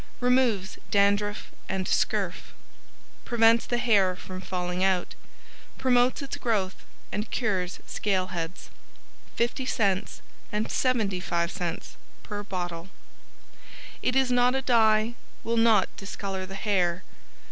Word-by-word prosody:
Removes 245 -6 +2
Dandruff 205 +1 +2 0.2
and 190 -1 -1
Scurf. - - -1 0.7
Prevents 230 -1 +4
the 240 - 0
Hair 200 -6 +3
from 185 +1 -8
falling 180 0 -2
out. 190 -2 +1 0.6
Promotes 255 +1 +3
its 275 - -5
growth 200 -6 -1 0.3
and 210 +1 -3
Cures 190 -6 -1
Scale 190 -3 -1
Heads. 170 +1 -5 0.7
50c 235 -5 0 0.3
and 210 +1 -1
75c 180 -8 -1 0.3
PER 205 -1 -5
BOTTLE 175 -3 -5 1.1
It 250 - 0
is 265 -1 +3
not 245 +1 +4
a 265 - -1
dye, 220 -2 +4 0.3
will 230 0 -1
not 225 -4 +4
discolor 195 -1 -5
the 195 - -8
hair. 185 -3 0
205 Hz, 110 wpm, -27 LUFS, 185-235 Hz, 1.1 s, Prevents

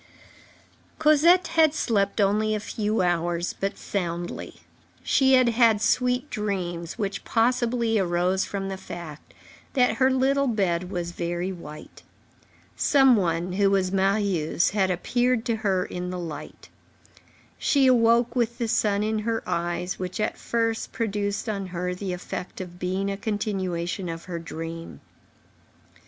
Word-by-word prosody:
Cosette 325 +3 +5
had 320 -2 +4
slept 200 -6 0
only 210 +2 +2
a - - -1
few 210 0 -1
hours, 175 0 0
but 195 0 -2
soundly. 175 -3 -4 0.4
She 265 -1 +3
had 255 -2 +5
had 230 -2 +4
sweet 250 +4 +1
dreams, 180 -5 -3
which 200 -3 -3
possibly 235 -1 +1
arose 180 +1 +1
from 195 -1 -4
the 195 0 -4
fact 170 -5 -9 0.4
that 250 -3 +2
her 260 0 +4
little 270 +1 +2
bed 185 -6 0
was 175 -2 -3
very 175 +2 -3
white. 155 -4 -10 0.7
Some 270 -3 +5
one, 175 -2 0
who 200 +1 +3
was 190 -2 +1
Marius, 195 -4 +1
had 195 -2 +1
appeared 240 +6 0
to 230 -2 0
her 195 -4 0
in 180 0 -5
the 180 - -4
light. 155 -4 -8 0.9
She 280 -2 +3
awoke 235 -1 +4
with 235 -1 0
the 235 -2 -1
sun 205 -2 +1
in 215 0 0
her 225 +1 -2
eyes, 175 +1 -2
which, 185 +1 -4
at 215 - 0
first, 230 -1 -1
produced 205 -1 -2
on 200 -3 -3
her 180 0 -3
the 185 +1 -4
effect 180 0 -6
of 175 -1 -8
being 190 +2 -1
a 195 - -4
continuation 190 -4 -2
of 165 0 -6
her 175 -2 -5
dream. 165 0 -7
200 Hz, 145 wpm, -25 LUFS, 180-230 Hz, 0.9 s, Cosette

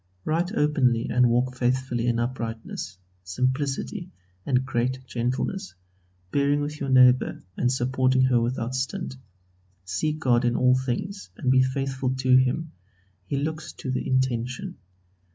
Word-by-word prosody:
Write 170 +4 0
openly 135 - +2
and 125 0 +4
walk 125 +2 +1
faithfully 125 -1 0
in 120 -1 +2
uprightness, 115 -5 -4 0.3
simplicity, 135 - -2 0.4
and 130 -1 +2
great 130 0 -1
gentleness, 130 - -2 0.6
bearing 140 +1 +2
with 150 +1 -4
your 140 - -3
neighbour, 130 -1 +5
and 125 - +1
supporting 130 0 +2
her 125 -2 +3
without 120 +1 -2
stint. 130 +4 -3 0.7
Seek 150 - -1
God 125 -5 +2
in 120 0 +1
all 125 +1 +4
things 130 +11 -3
and 130 -3 +1
be 130 0 +5
faithful 130 0 -1
to 130 -1 +3
Him. 130 +5 +2 0.6
He 140 - -1
looks 155 +2 -3
to 130 - -5
the 130 - -2
intention. 130 -1 -1
130 Hz, 135 wpm, -25 LUFS, 125-140 Hz, 0.7 s, neighbour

